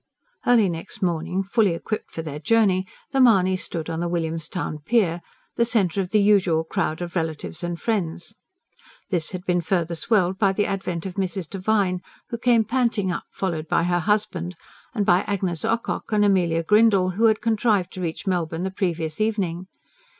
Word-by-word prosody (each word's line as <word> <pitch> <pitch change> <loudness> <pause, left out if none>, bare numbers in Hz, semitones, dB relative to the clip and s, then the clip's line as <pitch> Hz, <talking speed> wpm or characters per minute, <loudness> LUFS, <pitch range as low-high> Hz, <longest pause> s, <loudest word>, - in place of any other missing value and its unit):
Early 235 -4 +5
next 180 +5 -5
morning, 175 +2 0
fully 200 -2 +2
equipped 215 +5 -4
for 165 - -6
their 150 -2 -6
journey, 195 -1 +2 0.2
the 270 - +1
Mahonys 190 -7 +5
stood 165 -3 -4
on 160 - -3
the 175 - -1
William's 165 -2 -2
Town 165 -4 -4
pier, 175 0 +1 0.4
the 235 - +4
centre 200 -6 +1
of 180 - -4
the 215 - +3
usual 190 -6 +3
crowd 165 -1 -2
of 175 0 -7
relatives 160 - -3
and 175 -1 -3
friends. 190 -3 -2 0.8
This 170 -4 0
had 185 0 -6
been 175 -1 +1
further 170 -1 0
swelled 190 +1 +1
by 195 -2 +3
the 205 +1 +1
advent 190 -4 -3
of 190 0 -6
Mrs. 190 -2 -2
Devine, 195 -1 0 0.3
who 235 - -4
came 235 -2 +4
panting 230 -5 0
up 180 - -4
followed 165 -5 -3
by - - +2
her 175 0 +1
husband, 185 -3 -1 0.4
and 205 -3 +1
by 175 0 +4
Agnes 185 -5 -2
Ocock 230 0 -2
and 210 -1 +3
Amelia 175 -4 +2
Grindle, 205 -1 +4
who 215 +6 +1
had 220 -1 +4
contrived 215 -5 +1
to 185 - -6
reach 170 +3 -4
Melbourne 170 -3 -1
the 190 - -2
previous 170 -3 -2
evening. 190 -5 -1
185 Hz, 180 wpm, -23 LUFS, 170-210 Hz, 0.8 s, Early